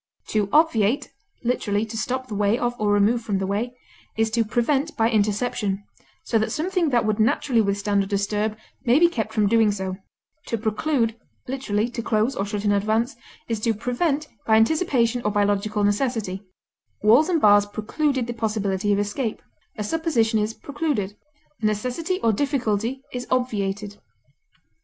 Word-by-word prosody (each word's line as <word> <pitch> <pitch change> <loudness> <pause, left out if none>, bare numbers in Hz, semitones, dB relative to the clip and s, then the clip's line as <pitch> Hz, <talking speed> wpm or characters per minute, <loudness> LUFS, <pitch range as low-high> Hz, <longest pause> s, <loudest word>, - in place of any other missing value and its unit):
To 210 -2 0
obviate 270 -5 +3 0.3
(literally, 215 -3 0
to 225 - -8
stop 255 +3 -2
the 220 - -7
way 205 +2 +2
of 240 0 -1
or 210 -1 +1
remove 205 +4 +3
from 210 -3 -1
the 190 - -1
way), 225 +6 -2 0.4
is 220 0 +1
to 230 +1 +2
prevent 265 +8 0
by 225 +1 +3
interception, 210 -2 0 0.4
so 225 - +1
that 220 - -1
something 350 0 0
that 240 -4 +2
would 215 0 0
naturally 230 +2 +2
withstand 200 0 +1
or - - -6
disturb 210 +2 -1 0.3
may 245 0 +4
be 340 +2 +6
kept 220 -10 -3
from 215 -1 +2
doing 220 0 +4
so; 190 -2 -4 0.5
to 230 - -1
preclude, 225 +2 0 0.3
(literally, 240 -5 -1
to 235 - -4
close 220 +2 +1
or 195 - -2
shut 205 0 -3
in 205 - +3
advance) 220 +6 +1 0.3
is 225 -2 -2
to 225 +1 0
prevent 280 +7 -1 0.2
by 220 - +5
anticipation 245 -1 +2
or 210 - +1
by 205 0 +2
logical 205 +1 0
necessity; 205 -3 0 0.6
walls 240 +11 +5
and 340 -3 +2
bars 205 -4 +5
precluded 260 +5 -1
the 240 - -4
possibility 210 -3 -1
of 200 - +3
escape; 205 +3 -2 0.4
a 210 - -2
supposition 230 -5 +1
is 215 +1 -1
precluded; 280 -10 -2 0.5
a - - -1
necessity 255 - -1
or 225 -1 +3
difficulty 250 -1 -1
is 250 0 -4
obviated. 205 -5 -1
220 Hz, 165 wpm, -23 LUFS, 205-250 Hz, 0.6 s, be